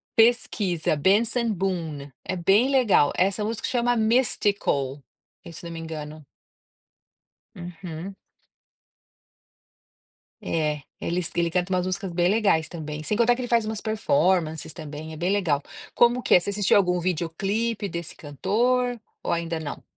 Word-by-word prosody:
Pesquisa 210 -8 +2
Benson 220 - +3
Boone 165 -7 -3
é 185 - -2
bem 195 +9 +3
legal, 240 - +4
essa 195 +3 +1
música 225 +1 -3
chama 245 -1 +1
Mystical 205 - +1 0.5
se 170 - -10
eu - - -6
não - - -7
me 165 - -6
engano. 155 -2 -7 1.3
Uhum. 175 +1 -8 2.3
É, 150 -2 -1 0.2
eles 175 0 -1
ele 170 -1 +1
canta 180 +1 -1
umas 180 0 +1
músicas 185 -1 -3
bem 175 +1 +2
legais 200 -7 +2
também, 155 -2 -6
sem 210 +6 -1
contar 240 +1 +4
que 255 - -5
ele 245 - -4
faz 230 -2 +3
umas 220 -1 -4
performances 175 -7 +1
também, 155 -1 -8
é 155 - -8
bem 175 +4 0
legal. 165 -8 +1 0.3
Como 240 +1 +3
que - - +2
é? - - +7
Você 190 - -2
assistiu 205 0 +3
algum 180 -2 +2
videoclipe 195 +6 -1
desse 170 -1 -6
cantor 240 - 0 0.2
ou - - -3
ainda 165 -1 -2
não? 150 -2 -6
180 Hz, 145 wpm, -25 LUFS, 160-220 Hz, 2.3 s, é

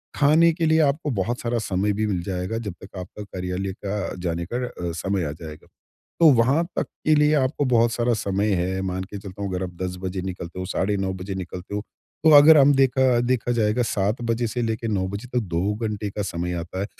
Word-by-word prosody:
खाने 155 +4 +5
के 165 0 -1
लिए 160 0 +4
आपको 150 +1 +1
बहुत 115 +2 -1
सारा 120 0 -1
समय 100 -1 0
भी 110 +2 -1
मिल 95 -4 -1
जाएगा 95 +3 -3
जब 105 -5 -5
तक 95 0 -11
आपका 95 +3 -7
कार्यालय 95 0 -4
का 100 0 -3
जाने 85 -1 -2
का - - 0
अ, - - -9 0.2
समय 95 +1 -1
आ 75 - -3
जाएगा। 75 0 -10 0.5
तो 165 -2 +8
वहाँ 130 +8 +3
तक - - +1 0.2
के 155 - +5
लिए 150 0 +4
आपको 140 +1 +1
बहुत 120 -2 +3
सारा 120 +1 +1
समय 100 -1 -1
है, 95 +2 -2
मान 95 -1 -3
के 100 +2 -8
चलता 100 0 -9
हूँ 100 - -2
अगर 90 0 -2
आप 90 - -5
10 90 0 -3
बजे 95 0 -3
निकलते 90 -1 -6
हो, 95 - -3
साढ़े 100 +2 -1
9 95 -1 -1
बजे 95 +1 -6
निकलते 90 +1 -6
हो। 105 - -1 0.4
तो 160 - +6
अगर 155 +2 +8
हम 145 0 +6
देखा 130 -2 +3
देखा 120 0 0
जाएगा 115 0 +1
7 105 +1 -1
बजे 115 0 0
से 120 +2 -3
लेके 115 0 -2
9 100 -4 0
बजे 100 +5 -6
तक 125 - +3
2 95 +5 +1
घंटे 105 -2 -3
का 105 - -4
समय 90 -2 -3
आता 85 +3 -6
है। 100 - -1
105 Hz, 230 wpm, -23 LUFS, 95-120 Hz, 0.5 s, तो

